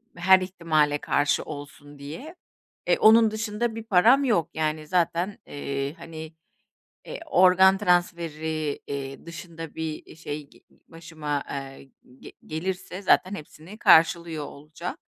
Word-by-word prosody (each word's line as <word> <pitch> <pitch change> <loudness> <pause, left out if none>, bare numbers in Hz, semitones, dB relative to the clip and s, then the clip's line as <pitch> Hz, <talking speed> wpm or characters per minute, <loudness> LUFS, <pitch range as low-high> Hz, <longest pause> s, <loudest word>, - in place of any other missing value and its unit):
her 185 +2 +5
ihtimale 160 -5 +1
karşı 145 0 +1
olsun 145 -1 -10
diye. 210 - -9 0.5
E, - - +3
onun 220 0 +6
dışında 220 +1 -2
bir 225 - -6
param 225 +7 +5
yok, 175 - +1
yani, 155 -1 -2
zaten, 180 +2 0
eee, 140 0 -4
hani, 160 -1 -9 0.7
eee, - - -7
organ 190 - +5
transferi, 160 -5 -1
ııı, 135 0 -6
dışında 165 -2 -9
bir, 160 -1 -5
eee, - - -14
şey, 150 -2 -7 0.2
ııı, - - -27
başıma, 155 -3 -5
eee, 135 -1 -7 0.3
ge - - -12
gelirse 180 +3 -5
zaten 185 +1 +3
hepsini 160 +6 -12
karşılıyor 165 -4 +4
olacağım. 155 +5 -8
165 Hz, 125 wpm, -25 LUFS, 150-185 Hz, 0.7 s, onun